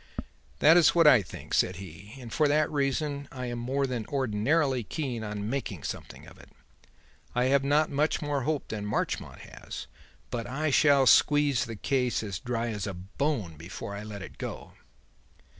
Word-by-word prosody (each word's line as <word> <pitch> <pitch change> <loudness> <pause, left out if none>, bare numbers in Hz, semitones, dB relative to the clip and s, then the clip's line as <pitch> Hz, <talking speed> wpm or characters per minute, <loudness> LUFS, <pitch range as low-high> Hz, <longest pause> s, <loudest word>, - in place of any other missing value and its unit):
"That 160 +3 +6
is 170 -1 +5
what 170 -1 +5
I 130 -7 +8
think," 90 - -10
said 90 - +2
he; 95 +4 -10
"and 120 -4 -9
for 155 -2 +3
that 150 +1 +2
reason 140 0 -1
I 125 -1 -5
am 120 -1 -4
more 135 +4 0
than 125 -4 -3
ordinarily 130 +2 +1
keen 125 -3 -4
on 105 -1 -4
making 110 - -3
something - - -7
of - - -15
it. - - -16 0.9
I 125 - +2
have 140 -1 +4
not 145 +3 +2
much 150 +3 +1
more 145 -3 -1
hope 150 +3 -2
than 105 -2 -4
Marchmont 105 +1 -3
has; - - -9 0.5
but 115 -2 -3
I 145 +4 -1
shall 140 -1 +5
squeeze 145 -1 +4
the 115 - -6
case 125 +1 0
as 100 -4 -4
dry 120 -1 -2
as 105 -2 -3
a 100 - -4
bone 100 - -3
before 90 +5 -7
I 100 - -5
let 105 -3 -9
go. - - -6
125 Hz, 175 wpm, -28 LUFS, 105-145 Hz, 0.9 s, I